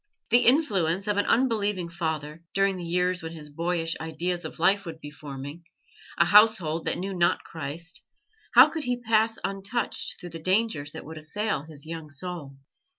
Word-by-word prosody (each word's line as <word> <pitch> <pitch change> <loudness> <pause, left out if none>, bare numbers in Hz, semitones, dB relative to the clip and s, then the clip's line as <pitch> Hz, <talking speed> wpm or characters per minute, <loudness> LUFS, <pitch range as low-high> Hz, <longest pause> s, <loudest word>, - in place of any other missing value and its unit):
The 240 +1 +5
influence 195 - +3
of 210 -1 +1
an 205 - +1
unbelieving 210 -7 +1
father, 160 -2 -4
during 195 0 +3
the 180 - -6
years 180 +1 0
when 160 0 -6
his 150 -2 -8
boyish 165 +1 -1
ideas 170 +3 -2
of - - -7
life 195 +4 +3
would 165 -3 -8
be 145 -2 -9
forming; 145 +2 -8 0.5
a 170 - +5
household 180 -5 +5
that - - +1
knew 195 +2 -3
not 175 -2 +2
Christ 165 +2 -6 0.5
how - - +10
could 320 -3 -3
he 245 0 0
pass 225 -1 +2
untouched 195 +5 -2
through 175 -2 -9
the 165 - -7
dangers 185 -5 +1
that - - -8
would 160 +1 -8
assail 205 0 -2
his 145 -2 -8
young 160 -1 -7
soul? 145 -2 -6
175 Hz, 175 wpm, -27 LUFS, 160-200 Hz, 0.5 s, how